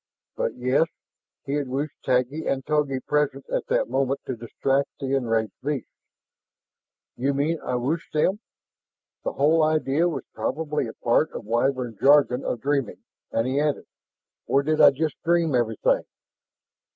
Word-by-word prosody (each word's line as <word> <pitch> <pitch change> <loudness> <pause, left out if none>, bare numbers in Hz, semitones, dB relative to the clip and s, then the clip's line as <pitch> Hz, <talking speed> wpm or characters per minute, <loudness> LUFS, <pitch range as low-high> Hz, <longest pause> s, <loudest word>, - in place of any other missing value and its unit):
But, - - -2
yes, 130 +6 +2 0.6
he 140 - -3
had 145 -2 -1
wished 140 +3 -2
Taggi 130 +5 0
and 135 -1 -1
Togi 145 -3 0
present 145 -2 0
at - - -1
that - - +1
moment 135 +2 0
to 130 - -3
distract 135 +4 -1
the 135 0 -2
enraged 115 -4 0
beast. 140 -3 -2 1.3
"You 135 +3 0
mean 155 +4 0
I 125 - -2
wished 140 +7 -2
them?" 185 +7 +1 0.8
The - - -2
whole 155 +4 +3
idea 155 +1 +2
was 165 - -4
probably 150 -2 -2
a 110 - -7
part 120 +6 +3
of - - -6
the 105 - -16
Wyvern 120 -2 0
jargon 140 -2 +5
of 115 - -3
dreaming 140 -4 -1 0.3
and 115 - +1
he 130 +2 0
added, 150 -1 0 0.6
"Or 140 +1 +3
did 155 +1 +2
I - - +10
just 150 +2 -3
dream 170 -2 +2
everything?" 115 -3 +2
140 Hz, 155 wpm, -25 LUFS, 125-150 Hz, 1.3 s, I